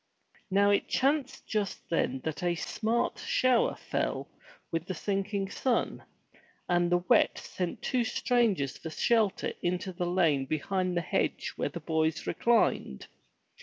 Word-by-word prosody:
Now 200 Hz, +1 st, +4 dB
it 200 Hz, -, +2 dB
chanced 275 Hz, 0 st, 0 dB
just 210 Hz, -3 st, -2 dB
then 135 Hz, -5 st, 0 dB
that 160 Hz, +3 st, -3 dB
a 175 Hz, -1 st, +1 dB
smart 225 Hz, +7 st, -1 dB
shower 255 Hz, -2 st, +2 dB
fell -, -, -2 dB, 0.4 s
with 165 Hz, +1 st, -2 dB
the 185 Hz, -, -3 dB
sinking 195 Hz, +1 st, -2 dB
sun, 255 Hz, -3 st, 0 dB, 0.7 s
and 175 Hz, 0 st, +2 dB
the 175 Hz, 0 st, +2 dB
wet -, -, +4 dB
sent 180 Hz, -2 st, -4 dB
two 250 Hz, -2 st, +1 dB
strangers 220 Hz, -, +1 dB
for 160 Hz, -, -6 dB
shelter 215 Hz, +4 st, +1 dB
into 180 Hz, +2 st, -2 dB
the 175 Hz, 0 st, -2 dB
lane 155 Hz, -7 st, +2 dB
behind 180 Hz, +4 st, -1 dB
the -, -, +2 dB
hedge 165 Hz, -, -1 dB
where -, -, -1 dB
the -, -, -6 dB
boys 160 Hz, 0 st, 0 dB
reclined. 220 Hz, -, +1 dB
185 Hz, 140 wpm, -30 LUFS, 170-220 Hz, 0.7 s, Now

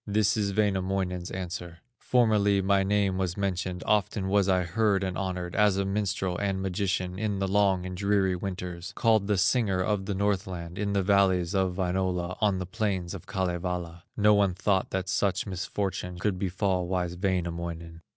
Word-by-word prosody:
This 105 Hz, +2 st, +2 dB
is 100 Hz, -3 st, -1 dB
Wainamoinen's 95 Hz, -3 st, 0 dB
answer: 90 Hz, -2 st, -6 dB, 0.2 s
"Formerly 105 Hz, -5 st, +3 dB
my 95 Hz, +1 st, +3 dB
name 100 Hz, -1 st, +1 dB
was 90 Hz, -1 st, -1 dB
mentioned, 95 Hz, -2 st, -2 dB
Often 100 Hz, -2 st, +1 dB
was 100 Hz, -1 st, +3 dB
I 90 Hz, -1 st, +3 dB
heard 100 Hz, +2 st, +1 dB
and 95 Hz, -1 st, -2 dB
honored, 90 Hz, -2 st, -3 dB
As 105 Hz, -2 st, +4 dB
a 100 Hz, -, 0 dB
minstrel 95 Hz, -2 st, -1 dB
and 100 Hz, -1 st, -1 dB
magician, 95 Hz, -1 st, -2 dB
In 105 Hz, -2 st, -1 dB
the 95 Hz, 0 st, -1 dB
long 95 Hz, -2 st, +2 dB
and 90 Hz, 0 st, -5 dB
dreary 100 Hz, -1 st, +1 dB
winters, 90 Hz, -1 st, -5 dB
Called 110 Hz, -4 st, +3 dB
the 105 Hz, -2 st, +2 dB
Singer 100 Hz, 0 st, +2 dB
of 95 Hz, +1 st, -1 dB
the 100 Hz, -, -1 dB
Northland, 95 Hz, -3 st, -2 dB
In 100 Hz, -1 st, -1 dB
the 100 Hz, -1 st, +2 dB
valleys 95 Hz, -2 st, +3 dB
of 95 Hz, -2 st, +1 dB
Wainola, 90 Hz, -1 st, -1 dB
On 105 Hz, -3 st, +3 dB
the 95 Hz, -, -3 dB
plains 95 Hz, -3 st, -2 dB
of 95 Hz, -, -9 dB
Kalevala; 90 Hz, -3 st, -3 dB, 0.2 s
No 105 Hz, 0 st, +5 dB
one 100 Hz, -3 st, +3 dB
thought 95 Hz, 0 st, +1 dB
that 95 Hz, 0 st, -2 dB
such 95 Hz, -1 st, 0 dB
misfortune 95 Hz, -1 st, -3 dB
Could 95 Hz, 0 st, -1 dB
befall 95 Hz, -1 st, 0 dB
wise 90 Hz, -1 st, -1 dB
Wainamoinen." 85 Hz, -3 st, -3 dB
95 Hz, 170 wpm, -28 LUFS, 90-100 Hz, 0.2 s, No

